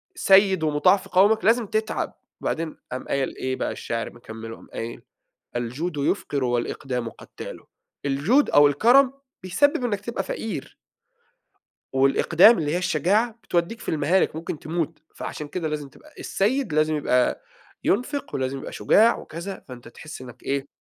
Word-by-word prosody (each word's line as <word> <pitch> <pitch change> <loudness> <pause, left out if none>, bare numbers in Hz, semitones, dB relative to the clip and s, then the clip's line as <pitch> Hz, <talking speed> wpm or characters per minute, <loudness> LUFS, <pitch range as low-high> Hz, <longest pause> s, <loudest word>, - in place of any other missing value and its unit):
سَيّد 195 - +5
ومُطاع 155 +6 +4
في - - -12
قَومَك، 205 +4 +4
لازم 225 0 +3
تتعب. 220 0 -2 0.3
وبعدين 160 -1 -3
قام 130 - -5
قايل 135 -1 -1
إيه 130 0 -2
بقى - - -2
الشِعر 115 -1 -4
مكمِّله 115 -1 -9
قام - - -16
قايل: 115 +1 -5 0.6
"الجود 145 +8 -3
يفقر 140 -1 0
والإقدام 125 0 -2
قتّال." - - -10 0.5
الجود 155 - +3
أو 145 0 +7
الكرم 245 - +5 0.3
بيسبب 250 +7 +2
إنّك 205 -4 -1
تبقى 235 +2 -3
فقير 215 -11 -5 1.2
والإقدام 160 - +5
اللي 150 -1 -1
هي - - +2
الشجاعة، 185 - +2
بتودّيك 175 +7 -1
في - - -10
المهالك، 155 +2 +2
ممكن 160 -1 -5
تموت. 165 0 -3
فعشان 150 -1 -6
كده 160 0 -3
لازم 150 -2 -4
تبقى 305 - -19
السَيّد 215 - 0
لازم 155 0 +2
يبقى 125 -4 +1 0.4
ينفق 280 +7 -1
ولازم 130 0 -2
يبقى - - -8
شجاع 225 +3 +4
وكذا، 175 +4 -7
فأنت 120 -2 -10
تحس 150 +6 -10
إنّك 125 -2 -12
إيه 140 0 -2
160 Hz, 145 wpm, -24 LUFS, 135-210 Hz, 1.2 s, أو